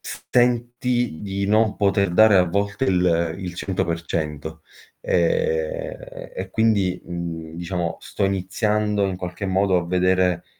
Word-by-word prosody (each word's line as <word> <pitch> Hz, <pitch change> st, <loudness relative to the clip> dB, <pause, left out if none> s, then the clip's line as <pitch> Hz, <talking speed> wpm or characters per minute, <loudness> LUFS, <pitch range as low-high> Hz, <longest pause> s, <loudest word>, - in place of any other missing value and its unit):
senti 120 Hz, -3 st, 0 dB
di 100 Hz, 0 st, -2 dB
non 110 Hz, +1 st, +2 dB
poter 100 Hz, -2 st, +2 dB
dare 110 Hz, +1 st, +6 dB
a 90 Hz, -, +5 dB
volte 100 Hz, +6 st, -1 dB
il 85 Hz, -5 st, +2 dB
il 90 Hz, -2 st, -6 dB
100% 80 Hz, -4 st, -3 dB, 0.4 s
Ehm, -, -, 0 dB, 0.4 s
e -, -, -5 dB
quindi, 100 Hz, -5 st, +1 dB
mhmm, 85 Hz, -2 st, -6 dB
diciamo 85 Hz, -1 st, -3 dB
sto -, -, -3 dB
iniziando 105 Hz, +2 st, 0 dB
in 95 Hz, -1 st, -3 dB
qualche 90 Hz, +2 st, -5 dB
modo 95 Hz, 0 st, +2 dB
a 85 Hz, -, -4 dB
vedere, 90 Hz, -1 st, +2 dB
95 Hz, 125 wpm, -22 LUFS, 90-110 Hz, 0.4 s, dare